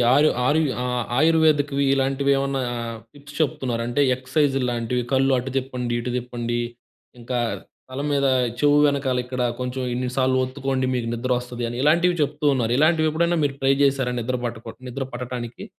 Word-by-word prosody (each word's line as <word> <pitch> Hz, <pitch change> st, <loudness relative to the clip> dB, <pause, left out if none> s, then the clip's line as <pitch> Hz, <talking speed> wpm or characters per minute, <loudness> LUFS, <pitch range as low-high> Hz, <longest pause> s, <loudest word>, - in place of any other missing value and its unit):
ఆరు 150 Hz, +2 st, +5 dB, 0.2 s
ఆరు 150 Hz, +3 st, +3 dB, 0.2 s
ఆహ్, 125 Hz, -1 st, -1 dB, 0.2 s
ఆయుర్వేదిక్‌వి 150 Hz, -3 st, +3 dB
ఇలాంటివి 135 Hz, +1 st, +1 dB
ఏమన్నా 135 Hz, -1 st, -1 dB, 0.5 s
టిప్స్ 145 Hz, 0 st, -14 dB
చెప్తున్నారు. 125 Hz, -5 st, -1 dB
అంటే, 120 Hz, +4 st, 0 dB
ఎక్ససైజ్‌లాంటివి. 125 Hz, -3 st, 0 dB
కళ్ళు 135 Hz, 0 st, +3 dB
అటు 130 Hz, +2 st, -3 dB
తిప్పండి, 125 Hz, -2 st, -3 dB
ఇటు 125 Hz, -, -3 dB
తిప్పండి. 120 Hz, -1 st, -3 dB, 0.6 s
ఇంకా 120 Hz, +1 st, -2 dB, 0.5 s
తలం 140 Hz, +3 st, -3 dB
మీద 140 Hz, -1 st, +2 dB, 0.3 s
చెవు 145 Hz, +1 st, +4 dB
వెనకాల 140 Hz, -3 st, +1 dB
ఇక్కడ 125 Hz, 0 st, -4 dB, 0.2 s
కొంచెం 125 Hz, +1 st, -3 dB
ఇన్ని 125 Hz, +1 st, -2 dB
సార్లు 130 Hz, 0 st, +2 dB
ఒత్తుకోండి, 130 Hz, 0 st, -2 dB
మీకు 120 Hz, -2 st, -2 dB
నిద్రొస్తది 125 Hz, 0 st, -2 dB
అని. 120 Hz, -, -6 dB
ఇలాంటివి, 170 Hz, +4 st, +3 dB
చెప్తూ 150 Hz, +1 st, -4 dB
ఉన్నారు. 120 Hz, -2 st, 0 dB
ఇలాంటివి 155 Hz, +1 st, +3 dB
ఎప్పుడైనా, 170 Hz, +2 st, +1 dB
మీరు 140 Hz, -1 st, -2 dB
ట్రై 135 Hz, 0 st, +4 dB
చేశారా? 135 Hz, -3 st, +1 dB
నిద్ర 125 Hz, +2 st, -2 dB
పట్టకు 115 Hz, -1 st, -6 dB, 0.2 s
నిద్ర 135 Hz, +2 st, -4 dB
పట్టటానికి? 120 Hz, -1 st, -6 dB
130 Hz, 150 wpm, -23 LUFS, 125-145 Hz, 0.6 s, ఆరు